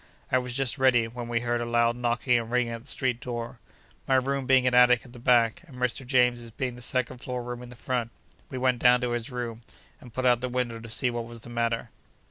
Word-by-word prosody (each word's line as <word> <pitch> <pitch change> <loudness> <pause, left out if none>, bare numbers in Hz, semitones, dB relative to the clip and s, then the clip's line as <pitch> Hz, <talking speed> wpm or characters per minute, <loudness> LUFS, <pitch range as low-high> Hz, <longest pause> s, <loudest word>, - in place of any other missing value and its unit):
I 130 - +4
was 125 -1 -5
just 135 0 0
ready, 125 -3 +4
when 120 +1 -7
we 115 -1 0
heard 120 0 -1
a - - -2
loud 120 0 +2
knocking 120 0 +1
and 115 -1 -6
ringing 120 -1 +1
at 115 - -6
the 130 - -19
street 130 -4 -1
door. 120 0 -5 0.5
My 135 - +3
room 135 0 0
being 130 -1 +5
an 125 - +2
attic 125 0 +5
at 125 - -15
the 120 - -11
back, 115 -2 +3
and 135 -5 -13
Mr. 125 +1 -1
James's 125 -2 +2
being 125 +2 -4
the 125 - -11
second 125 0 -1
floor 125 -1 -4
room 120 0 -6
in 125 - -10
the 125 - -11
front, 120 -1 -2 0.4
we 130 - -5
went 125 -1 +1
down 125 +1 +5
to 125 -1 -1
his 120 +2 -2
room, 120 -3 -5 0.4
and 125 - -13
put 130 +2 -3
up 120 -1 +4
the 125 - -2
window, 120 -2 -2
to 115 0 -10
see 125 +2 +1
what 120 -1 -3
was 115 -1 -10
the 120 - -10
matter. 115 -1 -1
125 Hz, 255 wpm, -27 LUFS, 120-125 Hz, 0.5 s, being